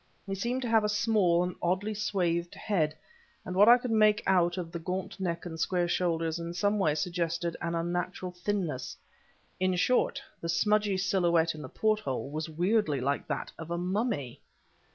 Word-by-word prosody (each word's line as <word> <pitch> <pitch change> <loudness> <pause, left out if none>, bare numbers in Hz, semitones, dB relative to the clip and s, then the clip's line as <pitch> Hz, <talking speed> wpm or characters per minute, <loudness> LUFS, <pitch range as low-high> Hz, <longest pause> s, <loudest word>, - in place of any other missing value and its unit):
He 195 - -4
seemed 240 +7 -2
to - - -2
have 225 -1 +4
a 210 - +1
small, 210 -5 +3
and 180 0 -2
oddly 190 +5 0
swathed 175 -5 -1
head, 155 -7 0 0.5
and 180 - -5
what 205 +4 +7
I 240 - +9
could 245 -1 -4
make 215 -1 +4
out 175 -2 +3
of 170 -2 -4
the 170 - -5
gaunt 185 +4 -4
neck 170 -2 -2
and 165 -2 -6
square 175 0 +1
shoulders 165 -2 0
in 170 +1 -5
some 205 +3 +1
way 155 -6 +2
suggested 170 +1 -2
an 170 0 -2
unnatural 175 +2 -2
thinness; 180 -8 -3 0.6
in 185 0 +2
short, 180 +8 +2 0.2
the 165 - -4
smudgy 210 +3 +2
silhouette 175 -3 +2
in 155 - -9
the - - -8
porthole 140 - -1
was 155 +2 -4
weirdly 175 -2 +1
like 140 +3 -1
that - - -3
of 165 0 -7
a 170 - -1
mummy! 180 - -2
180 Hz, 180 wpm, -29 LUFS, 170-205 Hz, 0.6 s, I